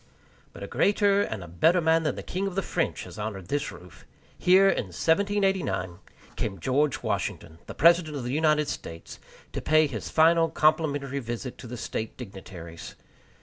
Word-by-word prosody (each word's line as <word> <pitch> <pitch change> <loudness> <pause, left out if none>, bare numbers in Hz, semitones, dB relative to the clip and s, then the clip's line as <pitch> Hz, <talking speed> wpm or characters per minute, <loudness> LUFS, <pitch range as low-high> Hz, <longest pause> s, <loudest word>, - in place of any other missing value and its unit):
But - - -10
a - - -5
greater 200 -1 +3
and 110 - -3
a - - -9
better 125 - +3
man 160 0 +3
than 155 - -1
the - - -7
king 190 +2 -3
of 190 - -5
the 195 - 0
French - - -2
has - - -10
honored 100 -4 -5
this 145 0 -1
roof. 90 -1 -14 0.3
Here, 190 +2 +5
in 160 - +1
1789, 180 - 0 0.4
came 95 -4 -3
George 135 - 0
Washington, 80 0 -3
the - - -8
President 170 -1 +4
of 130 - -5
the 120 +1 -3
United 150 -1 +2
States, 85 -9 -7 0.3
to - - -3
pay 155 0 +4
his 125 -7 -5
final 165 +1 +4
complimentary 145 -3 +1
visit 120 +1 -6
to - - -9
the 125 +1 -7
State 110 -1 -5
dignitaries. 90 -7 -9
145 Hz, 175 wpm, -27 LUFS, 105-165 Hz, 0.4 s, Here